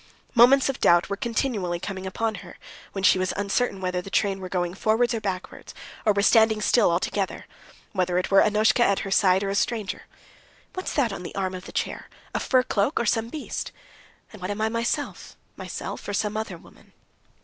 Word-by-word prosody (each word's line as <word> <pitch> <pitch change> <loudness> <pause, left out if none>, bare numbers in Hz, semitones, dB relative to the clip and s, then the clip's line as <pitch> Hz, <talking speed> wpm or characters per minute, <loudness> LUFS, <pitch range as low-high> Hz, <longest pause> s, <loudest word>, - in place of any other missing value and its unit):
Moments 260 +3 +6
of 270 - -2
doubt 175 +2 +4
were - - +1
continually 210 -6 -2
coming 190 +1 -5
upon 220 +3 -1
her, - - -12 0.4
when 195 - -4
she 185 - +5
was 185 0 -1
uncertain 200 +1 0
whether 180 -1 -2
the 195 - -10
train 195 -1 +1
were 185 -1 -7
going 175 -1 -1
forwards 220 +5 +1
or 225 - -2
backwards, 190 -2 -5 0.3
or - - +7
were 200 0 +1
standing 220 -1 +5
still 225 +1 +3
altogether; 185 +3 -1 0.5
whether 180 -2 0
it 180 - -1
were 195 - +7
Annushka 215 +3 +3
at 200 -4 +2
her 195 - -5
side 190 0 +4
or 195 - -1
a - - -1
stranger. 210 0 -2 0.7
"What's 370 - -4
that 245 -8 +1
on 195 - -6
the 180 - -8
arm 190 -1 -2
of 185 0 -7
the - - -9
chair, - - -3 0.2
a - - 0
fur 255 -2 +2
cloak 240 +4 0
or 235 - 0
some 225 +1 0
beast? 300 +3 -5 0.6
And 215 - -12
what 185 - -4
am 205 +1 -3
I 220 - +2
myself? 230 +1 -3 0.2
Myself - - -6
or 205 - -3
some 210 0 -1
other 215 -5 -4
woman?" - - -20
200 Hz, 205 wpm, -25 LUFS, 190-225 Hz, 0.7 s, or